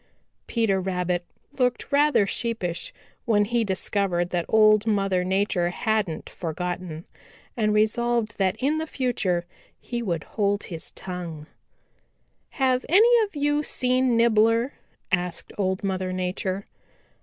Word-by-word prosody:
Peter 215 -5 +1
Rabbit 180 -1 -1 0.4
looked 250 +2 0
rather 285 -6 +4
sheepish 195 -6 -3 0.3
when 205 -3 +3
he 235 +2 +1
discovered 190 -3 -1
that 175 -1 -1
Old 215 0 +5
Mother 195 -4 +1
Nature 190 -1 +1
hadn't 210 -3 -1
for 165 -3 -5
gotten, 180 -2 -4 0.5
and 215 -3 +1
resolved 220 +1 +1
that 190 -1 +2
in 295 +4 0
the 320 - -3
future 195 - -1 0.3
he 240 -1 -4
would 170 -8 -2
hold 205 -1 -1
his 165 -3 -6
tongue. 175 -5 -6 1.0
"Have 260 -2 +1
any 455 +6 +6
of 405 - -15
you 290 +1 +1
seen 255 -3 +1
Nibbler?" 230 +2 +3 0.4
asked 180 -2 -2
Old 190 -1 0
Mother 185 -1 -1
Nature. 185 +1 -2
205 Hz, 125 wpm, -25 LUFS, 180-240 Hz, 1.0 s, any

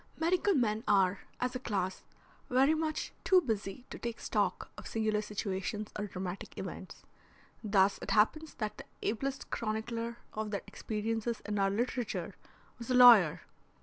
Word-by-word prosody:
Medical 360 +4 +2
men 220 -4 +1
are, 195 -1 +3 0.2
as 250 0 -1
a - - -1
class, 190 -7 -2 0.5
very 265 +4 +4
much 315 0 -2
too 375 - +6
busy 225 - -3
to - - -7
take 235 -1 -4
stock - - -1
of - - -9
singular 215 -1 0
situations 205 0 -3
or 210 0 -3
dramatic 185 0 -6
events. - - -7 0.6
Thus 200 -2 +3
it - - -6
happens 305 +9 +2
that 210 -1 -4
the - - -8 0.2
ablest 270 +5 -2
chronicler 230 +1 -3 0.2
of 215 0 -3
their 200 -1 -3
experiences 225 +1 -3
in 210 -1 -2
our 195 0 +3
literature 235 +2 -2 0.5
was 235 - -8
a 255 - +2
lawyer. 235 -11 +8
220 Hz, 150 wpm, -32 LUFS, 205-250 Hz, 0.6 s, lawyer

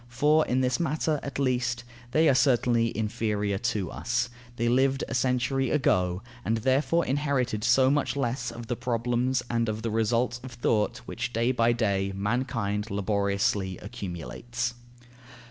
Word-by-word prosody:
For 150 +6 +3
in 130 +1 +1
this 130 +3 +1
matter, 155 -2 0
at 140 - -6
least, 125 -3 0 0.3
they 155 +5 +3
are 140 - +6
certainly 120 -3 +3
inferior 105 -2 -1
to 105 -6 -1
us: 120 +1 -1 0.2
they 120 0 0
lived 135 +3 +2
a - - -5
century 130 +1 +1
ago 90 -10 +1 0.2
and 115 +1 0
therefore 135 +8 +2
inherited 130 -6 0
so 130 +3 +4
much 145 +1 +1
the 140 - -1
less 120 0 -1
of 115 0 -8
the 120 - -2
problems 120 +2 0
and 115 -1 0
of 110 +1 -4
the 115 - -1
results 115 +2 +1
of 130 -2 -8
thought 115 0 0
which 120 +1 -4
day 115 +2 +2
by 120 -2 +3
day 100 -4 0
mankind 105 0 -1
laboriously 100 -2 0
accumulates. 105 +6 -5
120 Hz, 155 wpm, -27 LUFS, 110-130 Hz, 0.3 s, are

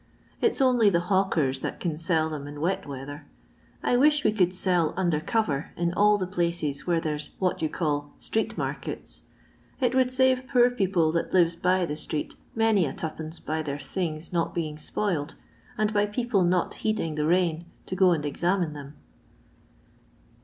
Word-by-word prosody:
It 455 - +3
's - - -2
only 245 -5 +5
the 175 -1 0
hawkers 160 -9 +2
that - - -4
can 170 -4 -2
sell 160 0 +1
them 150 -3 -5
in 145 0 -8
wet 190 +3 -1
weather. 140 +2 -7 0.6
I 245 - +3
wish 295 +3 +4
we - - +4
could 185 -4 +2
sell 180 -3 +1
under 175 -5 +1
cover 160 -5 -1
in 170 0 0
all 210 +2 +4
the 190 - -2
places 170 -6 -2
where 170 -2 +2
there 155 -2 -2
's 150 - -6
what 185 -3 0
you 155 - +1
call 145 -3 -2
' - - -29
street 220 - -2
markets.* - - -5 0.6
It 255 -2 +2
would 255 -1 +3
save 260 0 +2
poor 250 -2 +4
people 190 -8 +1
that 170 0 -2
lives 175 -2 +4
by 180 +1 +2
the 150 - -3
street 150 0 -4 0.2
many 220 -6 +3
a 135 - -4
twopence 160 +1 -5
by 155 +1 -2
their 145 -2 -3
things 160 0 -4
not 170 -1 0
being 155 -3 -3
spoiled, 160 -4 -2 0.4
and 215 -1 +1
by 205 0 +2
people 210 -2 +1
not 175 0 +1
heeding 215 -8 0
the 150 - -2
zmin 170 -1 +1 0.2
to - - -4
go 185 0 +5
and 155 -3 0
examine 175 +2 0
them." 145 0 -9
175 Hz, 185 wpm, -26 LUFS, 155-205 Hz, 0.6 s, only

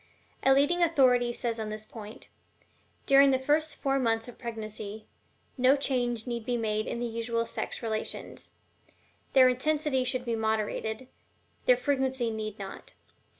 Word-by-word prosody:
A 270 - +4
leading 290 +6 +3
authority 255 -7 +4
says 235 -1 -3
on 215 -1 -3
this 215 0 -5
point: 215 -1 -10 0.8
"During 275 0 +6
the 265 - +3
first 295 +3 +1
four 275 0 0
months 225 -2 0
of 245 - -12
pregnancy, 215 -2 -6 0.5
no 260 +2 +6
change 245 -5 -1
need 235 -2 -4
be 245 +1 -1
made 215 -1 -1
in 235 - -3
the 240 - -2
usual 230 0 -2
sex 230 - -5
relations; 220 -1 -4 0.8
their 260 -1 +7
intensity 275 +1 +1
should 255 0 0
be 235 -1 -1
moderated, 220 +2 -2 0.6
their 250 - +6
frequency 265 -2 0
need 215 -1 -5
not. 195 -1 -9
240 Hz, 150 wpm, -29 LUFS, 220-265 Hz, 0.8 s, their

